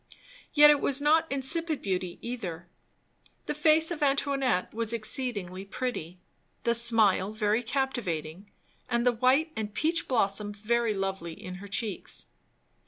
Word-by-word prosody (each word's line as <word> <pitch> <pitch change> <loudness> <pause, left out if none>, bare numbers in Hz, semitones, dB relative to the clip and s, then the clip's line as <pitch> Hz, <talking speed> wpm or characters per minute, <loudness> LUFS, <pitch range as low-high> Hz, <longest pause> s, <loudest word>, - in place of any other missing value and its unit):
Yet 295 0 +9
it 290 - +2
was 275 0 0
not 310 +2 +2
insipid 310 +3 +2
beauty 185 -2 -3
either; 185 -9 -6 0.8
the - - -2
face 310 +2 +3
of 330 - -4
Antoinette 275 -7 0
was 230 0 -1
exceedingly 215 -5 -1
pretty, 195 -5 -5 0.5
the 235 - +2
smile 220 -4 +3
very 215 +1 0
captivating, 205 - -3 0.4
and 240 0 0
the 245 - +5
white 255 +7 +2
and 210 -1 -5
peach 330 +2 0
blossom 205 -4 +1
very 220 +1 0
lovely 195 -4 -3
in 185 +2 -9
her 200 - -9
cheeks. 205 -1 -1
230 Hz, 135 wpm, -28 LUFS, 195-275 Hz, 0.8 s, Yet